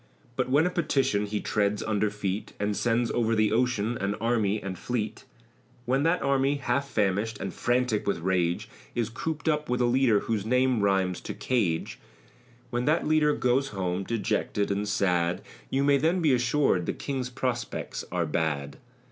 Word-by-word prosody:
But 130 0 -1
when 145 +5 +4
a 180 - +1
Petition 135 -11 +1
he 105 0 -2
treads 105 -1 0
under 105 -1 +1
feet, 100 -1 -4
And 105 0 0
sends 120 +1 +1
over 115 -1 +1
the 110 -1 +2
ocean 120 -1 +1
an 100 +1 -1
army 110 -2 +1
and 95 -2 -5
fleet, 110 +2 -3 0.6
When 130 +3 +1
that 165 +4 +2
army, 140 +1 +2
half 140 0 -1
famished, 105 -1 0
and - - -4
frantic 120 -3 0
with 100 - +1
rage, 85 0 0 0.3
Is 115 -2 0
cooped 160 +7 -4
up 150 -2 +1
with 125 - 0
a 125 - +3
leader 120 -3 +3
whose 110 -3 -1
name 125 0 +2
rhymes 95 -2 +1
to - - -6
cage; 100 -11 -1 0.7
When 120 +1 -1
that 155 +2 +2
leader 150 -1 +3
goes 130 +2 +1
home, 95 -4 -2
dejected 105 -1 -1
and 100 +1 -1
sad; 90 -4 +1 0.3
You 135 +1 +1
may 140 0 +4
then 165 +6 +2
be 155 -5 +3
assur'd 125 - +2
the - - 0
King's 130 -3 -3
prospects 125 -1 -3
are 90 -1 0
bad. 75 -3 -2
115 Hz, 175 wpm, -27 LUFS, 100-130 Hz, 0.7 s, when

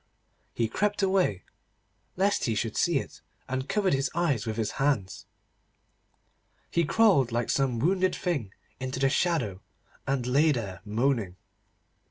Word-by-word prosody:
He 115 - +1
crept 205 - -1
away, 185 - +1 0.7
lest 195 +2 +1
he 115 - 0
should 110 0 -2
see 170 -4 +2
it, - - -6 0.3
and 130 +1 -3
covered 200 -5 +1
his 135 -1 +1
eyes 145 -11 0
with 110 0 -3
his 110 -2 -1
hands. 125 -10 0 1.4
He 170 -1 +2
crawled, 170 - +4
like 120 0 0
some 135 -4 +1
wounded 185 +8 +1
thing, 145 - -2 0.3
into 130 0 -4
the 135 0 +3
shadow, 130 - 0 0.5
and 135 -2 0
lay 145 +5 +3
there 100 -8 -5
moaning. 110 -3 0
135 Hz, 140 wpm, -28 LUFS, 115-170 Hz, 1.4 s, crawled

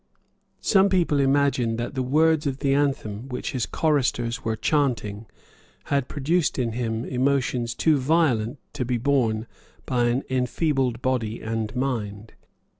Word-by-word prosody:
Some 200 -1 +4
people 175 -6 +2
imagined 135 -4 +2
that 120 +2 -4
the 130 - -1
words 155 +4 +2
of 135 -1 -2
the 135 -1 +1
anthem 135 -5 -1
which 125 +5 -4
his 130 -4 -2
choristers 125 -6 0
were 110 -1 -1
chanting 115 -5 -1 0.6
had 140 -3 0
produced 155 +3 0
in 120 -3 0
him 115 0 -2
emotions 125 -2 0
too 155 +2 +3
violent 130 -5 +1 0.2
to 145 -3 -2
be 120 0 -1
borne 115 -4 +1 0.4
by 125 -2 +1
an 120 +3 +1
enfeebled 130 -1 0
body 120 -4 -1
and 110 0 -3
mind. 110 -5 -3
130 Hz, 140 wpm, -24 LUFS, 115-140 Hz, 0.6 s, Some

